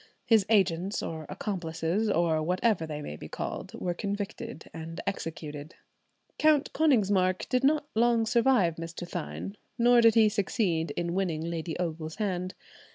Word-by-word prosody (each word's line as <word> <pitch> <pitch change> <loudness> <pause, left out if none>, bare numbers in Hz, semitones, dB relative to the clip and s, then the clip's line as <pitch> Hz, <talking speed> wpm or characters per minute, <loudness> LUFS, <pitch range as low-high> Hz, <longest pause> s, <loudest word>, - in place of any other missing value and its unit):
His 220 -4 +4
agents 190 -2 +2
or 160 -2 -5
accomplices, 185 +1 -2
or 165 -4 +2
whatever 180 +1 +1
they 150 -1 -5
may 75 - -6
be - - -9
called, - - -5
were 175 - -2
convicted 205 +5 -5
and 165 +1 -7
executed. 155 -5 -5 0.6
Count 305 -2 +3
Konigsmark 200 -11 +2
did 255 +1 +1
not 295 +1 +3
long 230 0 +3
survive 230 -7 +3
Mr. 165 +1 -6
Thynne, 80 - -5 0.2
nor 240 0 +6
did 230 0 +6
he 220 -1 +6
succeed 190 -5 0
in 170 0 -1
winning 175 -4 -1
Lady 165 -1 -3
Ogle's 160 -2 -3
hand. 185 -3 -2
185 Hz, 145 wpm, -29 LUFS, 165-220 Hz, 0.6 s, nor